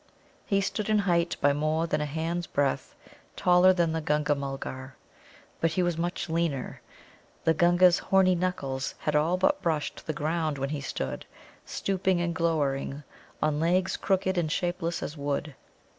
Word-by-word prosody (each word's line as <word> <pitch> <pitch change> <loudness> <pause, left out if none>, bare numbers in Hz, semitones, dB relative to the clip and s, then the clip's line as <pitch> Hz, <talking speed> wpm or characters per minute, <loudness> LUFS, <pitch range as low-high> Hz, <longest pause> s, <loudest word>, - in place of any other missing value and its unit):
He 195 -1 +2
stood 210 +2 -2
in 215 - +4
height 175 -4 +1
by 145 0 +4
more 155 +3 0
than 160 - -1
a 150 - -1
hand's 165 +3 -3
breadth 140 -2 -1 0.4
taller 180 +1 +5
than 170 -3 +1
the 160 0 -1
Gunga 150 -1 +1
mulgar. 135 -2 -6 0.6
But 165 0 +1
he 185 - +1
was 175 -1 0
much 175 +2 -2
leaner. 165 -5 -2 0.6
The 160 - +4
Gunga's 175 +2 +5
horny 190 -1 +3
knuckles 140 -7 -2
had 150 - -2
all 160 +4 +2
but 290 +10 +2
brushed 155 -4 -2
the - - +1
ground 155 0 -1
when 135 0 -2
he 150 -1 -3
stood, 65 - -4 0.4
stooping 190 -2 0
and 170 0 -1
glowering, 145 -4 -1 0.4
on 150 -1 +1
legs 180 +3 +1
crooked 190 -1 0
and 155 -3 -1
shapeless 175 0 -2
as 150 - -5
wood. 145 0 -3
165 Hz, 160 wpm, -28 LUFS, 150-180 Hz, 0.6 s, taller